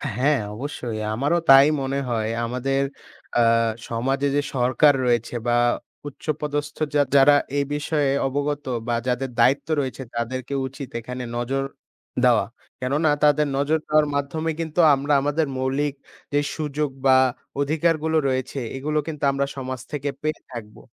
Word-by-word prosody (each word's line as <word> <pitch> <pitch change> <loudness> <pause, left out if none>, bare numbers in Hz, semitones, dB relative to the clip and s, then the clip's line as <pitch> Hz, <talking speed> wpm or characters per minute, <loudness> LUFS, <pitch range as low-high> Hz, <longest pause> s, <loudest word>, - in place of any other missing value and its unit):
হ্যাঁ, 135 +3 +2 0.2
অবশ্যই। 120 -3 -5 0.2
আমারও 145 +9 +1
তাই 135 +1 +9
মনে 135 +1 -1
হয় 110 -2 -1 0.2
আমাদের 135 +3 -1 0.6
আ - - +5 0.5
সমাজে 135 +5 0
যে 145 - +3
সরকার 130 +4 +4
রয়েছে 120 -1 0
বা 120 - +3 0.5
উচ্চপদস্থ 145 0 -4 0.2
যা 145 - +5
যারা 140 +1 +7 0.2
এই 140 - +1
বিষয়ে 145 -1 0 0.2
অবগত 145 +1 -2 0.2
বা 120 - +1
যাদের 125 +2 -1
দায়িত্ব 130 +4 +3
রয়েছে। 135 -1 -3
তাদেরকে 130 +3 -3
উচিত 135 0 -8
এখানে 125 +2 -6
নজর 135 +3 -1 0.6
দেওয়া, - - +4 0.3
কেননা 145 +5 +1
তাদের 150 0 +4
নজর 150 +3 +1
দেওয়ার 155 0 +3
মাধ্যমে 155 +3 -1
কিন্তু 165 0 -3 0.2
আমরা 140 +2 -1
আমাদের 145 +2 0
মৌলিক 135 +2 0 0.4
যে 145 - +4 0.2
সুযোগ 150 -1 -2 0.2
বা 130 -1 +7 0.4
অধিকারগুলো 160 +2 +1
রয়েছে, 130 +1 -2 0.2
এগুলো 150 +3 -1
কিন্তু 150 -3 -6
আমরা 140 0 0
সমাজ 130 -1 -5
থেকে 145 -1 -2
পেয়ে 155 0 -2
থাকবো। 110 -4 -9
140 Hz, 140 wpm, -23 LUFS, 130-150 Hz, 0.6 s, তাই